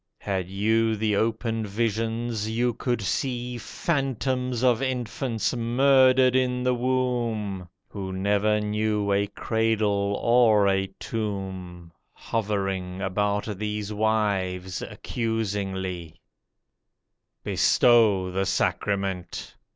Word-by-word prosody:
Had 95 -2 -3
you 110 +3 +1
the 105 -1 0
open 115 +1 0
visions 115 +1 -2
you 120 +2 +1
could 120 -2 -2
see 125 +4 -2
Phantoms 130 -2 -1
of 125 -2 +3
infants 125 -2 -2
murdered 130 +1 +4
in 125 -1 +1
the 125 0 +2
womb, 120 -7 -1 0.2
Who 95 -2 -6
never 100 +3 +1
knew 105 -1 0
a 100 +1 +1
cradle 105 -2 0
or 115 -4 +4
a 95 0 +1
tomb, 95 -5 -5 0.2
Hovering 95 -4 -2
about 100 +2 0
these 105 0 -3
wives 100 -4 0
accusingly. 95 -7 -3 1.2
Bestow 110 -7 +4
the 95 +1 -1
sacrament! 95 -3 -2
110 Hz, 95 wpm, -25 LUFS, 100-120 Hz, 1.2 s, murdered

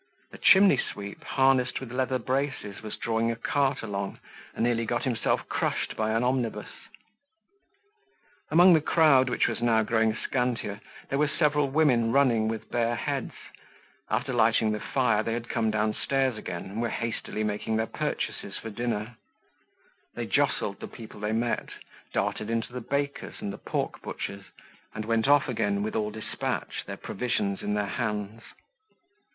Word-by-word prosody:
A - - -8
chimney 190 -6 +7
sweep, 100 -3 -5
harnessed 130 -2 +2
with 130 -3 -8
leather 130 +1 0
braces, 130 -6 -2
was 110 -1 -6
drawing 115 0 0
a 115 - -1
cart 135 +3 0
along, 100 -2 -3 0.4
and - - -1
nearly 120 -1 +2
got 120 +1 -1
himself 120 -4 0
crushed - - -1
by 110 0 0
an 115 +2 +1
omnibus. 125 -2 -1 1.8
Among 175 +3 +7
the 160 - +5
crowd 145 -5 +5
which 120 - +2
was - - -3
now 115 -2 +3
growing 110 0 +2
scantier, 120 -5 -2 0.3
there 135 - 0
were 150 - +4
several 150 -1 +2
women 130 -6 +3
running 120 -5 +3
with 110 -1 -4
bare 120 0 +1
heads; - - -2 0.8
after 135 -3 -1
lighting 110 -2 +3
the 105 - -2
fire, 115 -5 +1
they 115 +1 -2
had 115 0 -4
come 110 - +1
downstairs 110 +4 +1
again 90 -5 -5
and 105 +4 -4
were 120 - 0
hastily 115 -2 -3
making 105 +1 -1
their 110 0 +1
purchases - - -3
for 110 - -7
dinner; 115 0 -3 1.0
they - - -3
jostled 100 - 0
the - - -6
people 110 -3 -11
they 105 +1 -1
met, 115 +2 -1 0.4
darted 110 - -1
into 115 +1 -2
the 125 - -4
bakers' 140 +4 -3
and 100 - -4
the - - -9
pork - - -3
butchers', 100 0 -6 0.5
and 105 0 -4
went 115 +2 +1
off 145 -1 +5
again 100 -4 0
with 110 - -3
all 105 -1 0
despatch, 110 +1 -4
their - - -5
provisions 100 -4 -2
in 105 - -1
their 105 0 0
hands. 105 +1 -3
115 Hz, 160 wpm, -28 LUFS, 110-130 Hz, 1.8 s, chimney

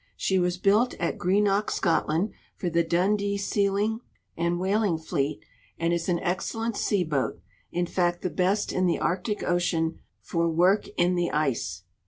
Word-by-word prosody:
She 190 - +1
was 180 0 0
built 210 +6 +3
at 170 - -2
Greenock, 200 +2 +2
Scotland, 170 +3 +1 0.2
for 175 - -3
the 170 +1 +3
Dundee 200 +4 +1
sealing 200 +2 0 0.4
and 170 +1 0
whaling 195 -1 +1
fleet, 150 -2 -2 0.3
and 165 +1 0
is 170 +1 -1
.an 170 -1 +2
excellent 225 +5 -2
sea 200 -3 +1
boat 150 -5 -1 0.2
— - - -34
in 175 +1 0
fact 175 0 0
the 185 - -1
best 190 +3 +1
in 185 0 +2
the 170 - +2
Arctic 190 +4 -1
ocean 170 -2 0 0.2
for 170 -1 -1
work 180 +5 +3
in 175 +1 +3
the 175 -1 0
ice. 150 -5 -1
180 Hz, 165 wpm, -26 LUFS, 170-200 Hz, 0.4 s, built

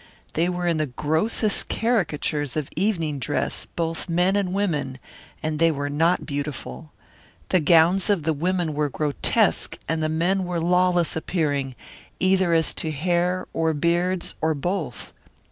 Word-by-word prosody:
They 170 +3 +1
were 180 0 -2
in 170 -2 +1
the 155 -1 0
grossest 160 - +1
caricatures 155 - -1
of 150 -3 -2
evening 165 -6 0
dress, 125 - -2
both 165 +1 -3
men 180 +3 +2
and 200 -3 0
women, 150 -10 -1 0.5
and 155 -1 -2
they 165 0 +5
were 145 -2 -2
not 165 +4 +2
beautiful. 140 - -5 0.6
The 185 - +3
gowns 170 +5 +4
of 195 -6 +2
the 160 +1 +1
women 175 +1 -1
were 150 0 0
grotesque 145 +1 +1
and 160 0 -1
the 155 - 0
men 175 +5 +1
were 175 -1 -2
lawless 180 0 +2
appearing, 145 -6 -1 0.4
either 185 -1 +3
as 165 -1 +3
to 160 - -2
hair 175 +4 0
or 160 -1 0
beards 175 +4 0
or 160 0 +1
both. 160 -3 -4
165 Hz, 150 wpm, -24 LUFS, 150-180 Hz, 0.6 s, they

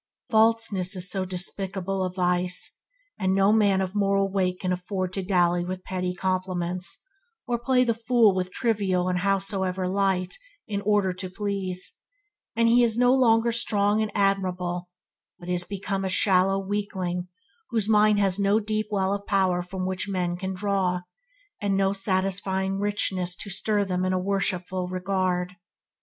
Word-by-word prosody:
Falseness 220 -4 +3
is 185 +1 -3
so 190 -2 -1
despicable 190 +1 -2
a 185 - -2
vice 180 0 0 0.4
and 190 -1 +1
no 195 +2 +4
man 200 -3 +3
of 185 0 -3
moral 195 -1 +1
weight 185 -2 0
can 185 -1 0
afford 185 0 -3
to 195 - -2
dally 175 -2 +2
with 185 +1 -5
pretty 180 -1 -3
complements, 185 -1 -2 0.4
or 240 -1 -1
play 250 +1 +3
the 235 -2 +1
fool 230 -2 +3
with 185 -1 -2
trivial 195 -5 0
and 180 -1 0
howsoever 190 -1 0
light, 190 -1 0 0.3
in 200 -2 -2
order 205 -3 +2
to 185 0 -4
please, 195 -2 -3 0.6
and 230 0 +3
he 240 +1 +5
is 230 -2 +2
no 245 +1 +5
longer 235 -3 +4
strong 210 -2 +1
and 215 -1 -2
admirable, 185 -3 0 0.5
but 175 - -12
is 180 0 +1
become 195 0 -3
a 190 - -1
shallow 190 0 +3
weakling 190 -3 -3 0.4
whose 225 -4 0
mind 210 -1 +4
has 195 -1 +1
no 200 +2 +3
deep 215 0 -2
well 195 -2 0
of 200 0 -5
power 190 -3 +2
from 185 +1 -5
which 185 +2 -3
men 180 -2 -1
can 190 +1 -4
draw, 185 -2 0 0.6
and 200 -1 +1
no 195 0 +2
satisfying 195 0 -1
richness 190 -3 0
to 200 - -4
stir 210 +2 0
in 200 - -1
them 180 -1 -1
a 185 0 +1
worshipful 185 -1 -1
regard. 185 0 -1
190 Hz, 160 wpm, -25 LUFS, 185-205 Hz, 0.6 s, he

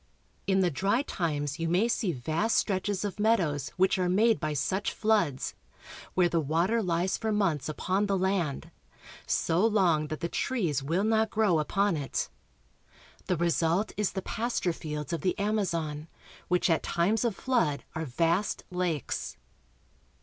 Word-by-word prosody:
In 190 -1 +3
the 180 -2 +2
dry 200 - +1
times 150 - -2
you 165 0 -1
may 185 +7 +3
see 220 -5 0
vast 160 - 0
stretches 195 0 0
of 205 0 -5
meadows 175 - +1
which 190 +1 +3
are 180 -1 +1
made 220 +4 +3
by 155 -3 -2
such 190 +8 -1
floods, 205 -12 +1 0.6
where 180 -1 +4
the 170 -1 +1
water 170 +10 +1
lies 180 -1 0
for 220 -1 -1
months 170 -10 0
upon 190 +6 0
the 195 -1 +1
land, 185 -6 -1 0.6
so 165 +4 +1
long 180 -9 +3
that 155 0 -5
the 170 - -2
trees 175 - -1
will 165 +8 0
not 220 0 +2
grow 210 -7 +2
upon 195 +5 +1
it. 140 -3 -2 1.0
The 180 -2 +1
result 170 +4 +1
is 210 -2 -1
the 190 - -3
pasture 225 -6 -1
fields 150 0 -5
of 165 - -2
the 185 - 0
Amazon, 170 -8 -1 0.4
which 180 0 +2
at 165 -3 +2
times 195 +8 +1
of 235 -4 0
flood 230 - 0
are 160 -1 -3
vast 170 +9 0
lakes. 175 -7 -2
180 Hz, 155 wpm, -29 LUFS, 160-205 Hz, 1.0 s, where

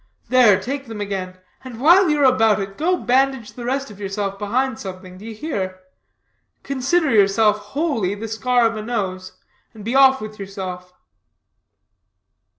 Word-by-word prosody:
There, 240 -6 +5
take 275 +6 -5
them 225 -2 -7
again, 190 -2 -4 0.3
and 250 -3 -9
while 345 +6 +5
you 300 -1 +1
are - - +4
about 225 -5 +4
it, 195 0 -5
go 360 - +1
bandage 265 -3 0
the 240 - -8
rest 270 -1 -2
of 205 - -14
yourself 195 0 -4
behind 235 +4 -1
something. 185 -1 -9
D'ye 220 +2 -8
hear? 195 -9 -4 0.8
Consider 275 +4 0
yourself, 210 0 +3 0.2
wholly, 230 - 0
the 220 +2 -6
scar 240 +2 +1
of 225 0 +1
a 215 - -4
nose, 190 -5 -4 0.4
and 210 -2 -11
be 230 - -2
off 265 0 +6
with 215 0 -9
yourself." 185 -2 -7
220 Hz, 155 wpm, -20 LUFS, 195-265 Hz, 0.8 s, off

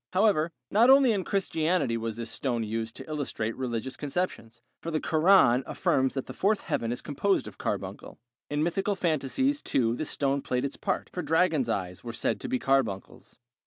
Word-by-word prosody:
However, 185 -5 +3 0.2
not 230 +5 +5
only 270 -2 +7
in 200 -4 0
Christianity 175 - 0
was 115 -1 -3
this 115 -1 -5
stone 120 -4 -1
used 110 +1 -4
to - - -9
illustrate 140 -7 -3
religious 130 0 -3
conceptions, 140 -7 -4 0.2
for 165 - -4
the 155 -1 0
Koran 155 -7 +4
affirms 130 0 +1
that 135 - -2
the - - -8
Fourth 205 +2 +1
Heaven 115 0 -2
is 120 - -4
composed 195 +7 0
of - - -11
carbuncle. - - -4 0.3
In 145 +1 0
mythical 195 +4 0
fancies 190 - 0
too 115 -3 +1
this 155 - -3
stone 140 0 0
played 125 +1 -1
its 140 - -4
part, - - -3
for 180 - -2
dragon's 160 -5 +2
eyes 90 -1 -3
were 120 -1 -6
said - - -1
to - - -5
be 260 - +1
carbuncles. 135 - -1
145 Hz, 185 wpm, -28 LUFS, 120-185 Hz, 0.3 s, only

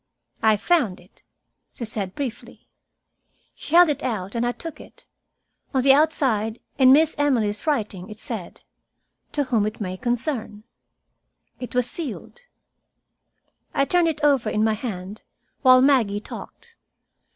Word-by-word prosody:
"I 220 -1 +4
found 240 - +1
it," 180 +3 -23 0.5
she 235 - -6
said 200 -4 -4
briefly. 255 -5 -7 0.9
She 315 - -4
held 350 0 +8
it 295 -3 -1
out, 205 -6 -3
and 235 0 -1
I - - +1
took 330 +5 -8
it. - - -17 0.7
On 260 - +2
the 270 0 +7
outside, 255 -7 +1 0.2
in 260 -1 +7
Miss 310 +3 +5
Emily's 240 -4 0
writing, 210 -9 -2
it 215 - -9
said, 220 -7 -7 0.7
"To 290 - +1
whom 230 -6 +1
it 215 - -6
may 185 -3 -4
concern." 240 -2 -2 1.0
It 250 -1 -7
was 250 -1 +2
sealed. 310 - -7 1.4
I 275 - +3
turned 350 +2 +2
it 310 -2 -3
over 275 -7 +3
in 215 0 0
my 220 0 +2
hand, 205 -2 -6 0.4
while 255 -1 +6
Maggie 240 -8 +3
talked. 465 - -11
240 Hz, 140 wpm, -23 LUFS, 215-285 Hz, 1.4 s, held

